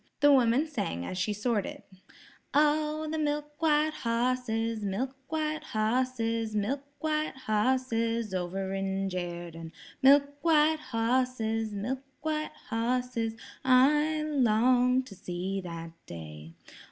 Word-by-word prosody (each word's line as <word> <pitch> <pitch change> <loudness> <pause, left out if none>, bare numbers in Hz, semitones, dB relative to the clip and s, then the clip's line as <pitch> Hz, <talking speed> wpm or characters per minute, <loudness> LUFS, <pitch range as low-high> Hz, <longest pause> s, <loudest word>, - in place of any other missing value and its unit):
The 290 0 +6
woman 255 +2 +4
sang 205 - -3
as 185 - -4
she 210 - 0
sorted: 210 0 -2 0.7
"Oh, 305 +1 +2
the 315 - -1
milk 295 0 -2
white 305 -1 +3
hosses, 230 -3 -1
milk 245 +7 -2
white 310 -1 -2
hosses, 230 0 0
Milk 245 +7 0 0.2
white 310 -1 -1
hosses 230 -1 +1
over 190 +1 -2
in 195 0 -1
Jerden, 170 -2 -5 0.3
Milk 285 +1 +5
white 315 -1 +4
hosses, 225 -3 0
milk 250 +7 -3 0.2
white 310 -1 -1 0.2
hosses, 235 -1 -1 0.3
I 295 +4 +4
long 250 -2 +3
to 255 - -12
see 190 +1 -4
that 165 -2 -7 0.2
day. 80 -1 -9
240 Hz, 115 wpm, -29 LUFS, 205-290 Hz, 0.7 s, The